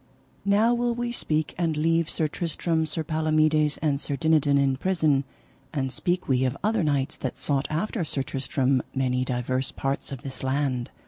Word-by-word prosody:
Now 210 +4 +4
will 240 0 0
we 240 0 -2
speak, 155 -9 -1
and 165 -3 0
leave 165 +1 +2
Sir 155 - +1
Tristram, 160 0 -1
Sir 160 +1 -3
Palomides, 155 -1 +2
and 145 -2 +1
Sir 145 - -2
Dinadan 150 -2 +3
in 135 -1 +2
prison, 155 -5 +2 0.5
and 135 -3 -2
speak 180 +6 -1
we 130 -1 +2
of 130 -1 0
other 215 -2 +2
knights 140 -3 0
that 130 -1 -4
sought 135 +1 0
after 180 +5 -1
Sir 140 -3 -2
Tristram 135 0 0
many 130 -1 +1
divers 130 +1 -1
parts 135 +1 -2
of 135 -3 -7
this 135 -1 -7
land. 130 -2 -1
150 Hz, 175 wpm, -26 LUFS, 135-165 Hz, 0.5 s, Now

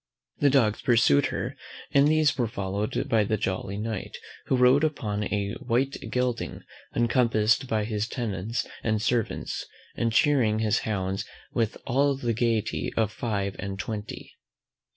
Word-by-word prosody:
The 145 - +5
dogs 120 -6 +3
pursued 115 - +4
her, - - -4 0.4
and 140 +1 +5
these 155 -2 +3
were 120 -3 0
followed 100 0 -2
by 110 -2 +3
the 110 +1 0
jolly 95 0 -2
Knight, 110 -2 -4 0.3
who 130 - +2
rode 125 +4 +5
upon 110 -10 -1
a 100 0 -1
white 130 +3 0
gelding, 125 -2 -1 0.3
encompassed 120 0 +2
by 110 -3 0
his 105 0 -2
tenants 115 -1 -3 0.2
and 110 -1 0
servants, 120 0 -1 0.3
and 115 -1 0
chearing 120 -4 +3
his 110 0 +2
hounds 95 -2 -1 0.3
with 115 -2 0
all 140 +3 +2
the 120 -3 -1
gaiety 115 -1 0
of 110 -2 +2
five 100 -4 -2
and 100 -1 -4
twenty. 105 +1 -6
115 Hz, 145 wpm, -27 LUFS, 105-125 Hz, 0.4 s, The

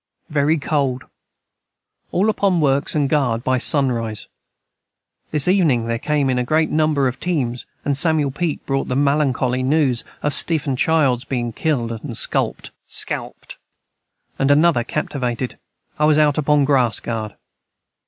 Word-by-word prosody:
Very 150 +2 +2
cold 140 -4 -1 1.1
all 195 +4 +1
upon 195 -4 +1
works 140 -1 +1
& 140 - +1
guard 130 -5 0
by 130 -1 +1
son 135 0 +3
rise 115 -3 -4 1.0
this 150 0 -1
evening 160 - +2
their 115 0 -2
came 150 0 0
in 130 -1 +1
a - - 0
great 155 +5 +1
number 155 -3 +2
of 125 - -4
teams 130 -9 -2 0.2
& 145 - +1
Samuel 150 -1 +2
Peak 160 +2 -3
Brought 135 -1 -1
the 125 - -2
malancoly 135 -3 +1
news 130 -3 +1 0.2
of 150 - 0
Stephen 155 -5 +1
Childs 135 -4 +2
being 120 -4 -3
Kilde 120 -5 -1
and 120 -7 -6
skulpt - - -1 1.7
and 135 - +2
another 150 -3 +4
Captivated 125 -3 -3 0.4
I 150 - +3
was 150 -1 +4
out 150 -1 +3
upon 150 0 +2
the - - +3
grass 130 -6 +2
guard. 110 -2 -5
140 Hz, 145 wpm, -20 LUFS, 125-155 Hz, 1.7 s, another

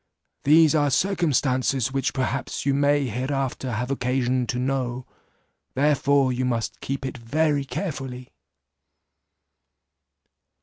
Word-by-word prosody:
These 155 +2 +6
are 145 -2 +3
circumstances 135 - +1
which 135 -1 0
perhaps 135 0 -3
you 140 - +2
may 145 0 +2
hereafter 130 +1 -2
have 125 +4 -2
occasion 125 -1 0
to 125 - -2
know, 125 -1 -2 0.7
therefore 140 -1 +3
you 125 +1 -2
must 120 -3 -2
keep 135 0 -4
it 130 -1 -5
very 145 +4 0
carefully." 135 -7 -5
135 Hz, 105 wpm, -24 LUFS, 125-145 Hz, 0.7 s, These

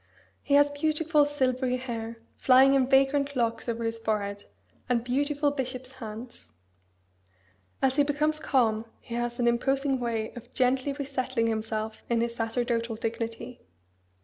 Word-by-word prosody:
He 285 - +2
has 290 0 +5
beautiful 305 0 +2
silvery 255 -3 0
hair, 230 -2 -5 0.2
flying 265 +1 +6
in 265 -2 +3
vagrant 275 +1 +3
locks 230 -1 0
over 230 0 -2
his 225 0 -2
forehead, 205 -2 -2 0.4
and 235 -2 +2
beautiful 285 +3 +1
bishop's 255 -2 -4
hands. 235 -1 -9 1.3
As 265 +1 +2
he 290 - +6
becomes 300 +2 0
calm 230 -7 +1
he 235 - -10
has 240 0 -2
an 240 - +1
imposing 270 +3 +1
way 230 -2 -2
of 240 - -11
gently 260 +2 +2
resettling 265 -4 -2
himself 220 -1 -2
in 235 -1 +2
his 235 0 -1
sacerdotal 235 0 -1
dignity. 230 +2 -5
250 Hz, 140 wpm, -28 LUFS, 230-275 Hz, 1.3 s, flying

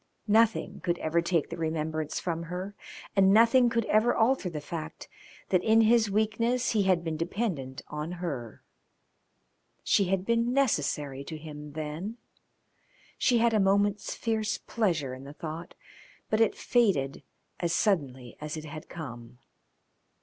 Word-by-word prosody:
Nothing 220 +1 +2
could 175 0 -1
ever 165 +1 +1
take 170 -3 0
the - - -4
remembrance 155 -1 -2
from 165 -2 -2
her, 180 +4 -5 0.4
and 195 -1 +5
nothing 235 +3 +6
could 230 -1 0
ever 220 +3 +3
alter 230 -4 +2
the 155 -3 -5
fact 160 +1 -7 0.4
that 180 -2 +2
in 225 +1 +5
his 225 -1 +4
weakness 230 +4 +1
he 215 - +2
had 185 -3 +2
been 160 -2 -3
dependent 165 - -3
on 150 +3 -5
her. 145 -11 -5 1.2
She 200 - +3
had 185 0 0
been 235 +2 +1
necessary 150 - 0
to 160 - -6
him 150 -1 -9
then. 160 +9 -5 1.0
She 245 - +3
had 230 0 +3
a 215 - +3
moment's 200 +1 +2
fierce 220 -2 -1
pleasure 165 - -1
in 130 +1 -9
the 140 +1 -9
thought, 160 +2 -7 0.6
but 215 +1 +3
it 225 - +3
faded 180 - +1 0.4
as 170 -1 0
suddenly 140 - 0
as 150 +1 -4
it 155 - -7
had 155 0 -9
come. 120 -7 -8
175 Hz, 150 wpm, -28 LUFS, 155-220 Hz, 1.2 s, nothing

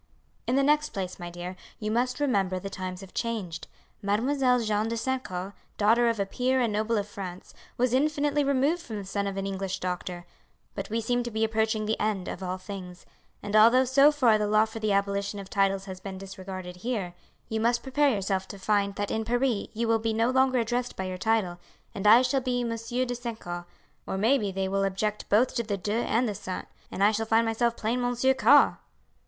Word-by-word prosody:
"In 250 - +2
the 275 - +3
next 300 +1 +2
place, 190 -3 -4
my 175 0 -6
dear, 175 +1 -7 0.2
you 215 0 -3
must 250 +2 0
remember 200 -10 +1
the 195 +2 -6
times 185 -1 -5
have 195 -1 -12
changed. 210 -9 -3 0.3
Mademoiselle 250 +5 +2
Jeanne 215 -1 0
de 230 +1 -2
St. 260 +2 -1
Caux, 185 +2 -5 0.2
daughter 230 +3 +4
of 230 -2 -1
a 200 - +1
peer 255 +6 0
and 235 -4 +1
noble 215 +2 0
of 205 0 -1
France, 185 -3 -8 0.2
was 250 0 +1
infinitely 290 +1 +2
removed 280 +5 +1
from 230 -10 -7
the 200 - -6
son 200 +1 -2
of 195 0 -4
an 195 - -2
English 195 -1 -3
doctor; 180 -1 -4 0.5
but 195 - -5
we 225 +2 -1
seem 245 +2 0
to 240 - -4
be 220 -1 -1
approaching 220 -1 +1
the 220 +1 -1
end 205 -4 -1
of - - -5
all 185 0 -3
things; 185 -2 -9 0.4
and 205 +1 -3
although 235 +4 +7
so 275 +3 +6
far 245 -7 +3
the 210 - 0
law 215 +1 +4
for 220 0 -8
the 215 -1 0
abolition 200 +1 0
of 195 -1 -8
titles 195 -1 +1
has 190 -2 -7
been 190 0 -7
disregarded 185 -1 -8
here, 195 -4 -3 0.3
you 220 - -2
must 235 +1 +1
prepare 285 +2 +2
yourself 195 -4 -1
to 200 - -8
find 200 0 +1
that 205 -1 -2
in 220 - -1
Paris 240 -1 0
you 230 +1 -1
will 225 0 +3
be 225 0 -1
no 225 +3 +2
longer 260 0 +3
addressed 245 +1 -1
by 190 - -3
your 185 -1 -5
title, 200 -5 0 0.3
and 200 +1 -1
I 230 +4 +8
shall 265 +1 +1
be 250 -1 -1
Monsieur 230 +2 -2
de 245 - -3
St. 235 -2 -5
Caux; 175 0 -6 0.4
or - - -2
may 235 +8 +3
be 205 -3 -2
they 190 0 -2
will 195 +1 0
object 200 +2 -2
both 230 +5 +3
to 235 - 0
the 210 -3 -3
de 205 +2 -3
and 235 +1 +1
the 210 - -2
St., 185 -1 -5 0.2
and 195 - -2
I 205 - +6
shall 220 +1 -2
find 225 +1 +3
myself 235 +1 0
plain 235 +3 -1
Monsieur 245 +2 +2
Caux." 265 +3 +5
215 Hz, 225 wpm, -27 LUFS, 195-245 Hz, 0.5 s, I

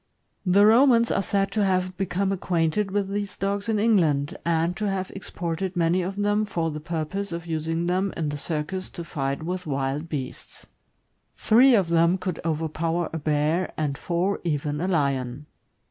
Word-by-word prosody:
The 200 +3 +6
Romans 235 +1 +5
are - - +2
said 195 +1 0
to 215 - +1
have 185 -1 0
become 195 +1 -1
acquainted 180 +1 0
with 195 0 -1
these 200 -1 -3
dogs 200 +2 -2
in 220 - +2
England, 165 -10 +2
and 170 +1 +1
to 210 -1 -1
have 190 -1 -3
exported 180 0 -4
many 175 +1 +2
of 190 +2 -3
them 205 +1 +1
for 165 -6 -2
the 150 - -5
purpose 165 +5 -3
of 170 0 -5
using 165 +1 -2
them 185 +2 0
in 160 -3 -1
the 145 - -4
circus 165 +5 -3
to 170 - -8
light 140 +1 -1
with 180 +1 -4
wild 140 +3 -2
beasts. 135 -5 -6 0.7
Tlnve 240 +1 +6
of 180 -4 -2
them 170 +2 +3
could 185 -2 -4
overpower 165 +1 -1
a 165 - -2
bear, 155 +4 0
and 150 -3 -1
four 175 +6 -1
even 150 -2 -1
a 180 - 0
lion. 140 -5 -1
175 Hz, 175 wpm, -25 LUFS, 155-195 Hz, 0.7 s, The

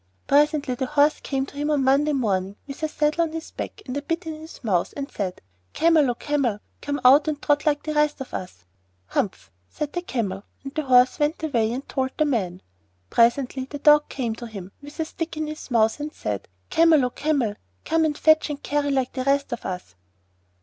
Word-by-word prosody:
Presently 290 -1 +3
the 255 +1 -2
Horse 300 +1 +3
came 270 -1 -2
to 280 - -14
him 295 +1 -2
on 290 -3 +2
Monday 280 +3 +3
morning, 200 -7 0
with 275 +1 -9
a 315 - +1
saddle 300 +2 +1
on 325 -1 0
his 325 0 -6
back 425 - -7
and 255 - -5
a 285 - -1
bit 330 +4 -3
in 320 - -4
his 310 -1 -11
mouth, 185 -6 0
and 280 0 -5
said, 185 -3 -4 0.3
'Camel, 320 -4 +4
O 240 - 0
Camel, 265 -7 0 0.2
come 285 0 -2
out 280 +5 +7
and 300 -2 -1
trot 290 +1 +1
like 290 -1 +2
the 310 - -3
rest 300 -1 +2
of 265 - -8
us.' 90 - -7 0.4
'Humph!' 190 - -2 0.2
said 295 -1 -4
the 350 - -2
Camel; 205 - -3 0.2
and 275 0 -7
the 310 - -1
Horse 250 -1 +5
went 300 +2 0
away 230 -8 +1
and 260 +3 -5
told 260 -1 -2
the 310 - +3
Man. 190 -10 -1 0.5
Presently 255 +2 +2
the 290 +2 -7
Dog 295 +1 +5
came 240 -5 -2
to 240 - -7
him, 195 -4 -8
with 290 +3 -12
a 320 - +1
stick 325 0 -5
in 310 - -1
his 305 -1 -7
mouth, 225 0 +2
and 300 +1 -4
said, 105 - -4 0.2
'Camel, 325 -5 +5
O 250 - -2
Camel, 280 -9 0 0.3
come 325 0 +2
and 300 -2 0
fetch 315 0 +4
and 295 -1 -5
carry 290 0 0
like 265 -2 0
the 260 - -2
rest 280 -1 +1
of 240 - -5
us. 180 - -6
280 Hz, 220 wpm, -24 LUFS, 245-300 Hz, 0.5 s, out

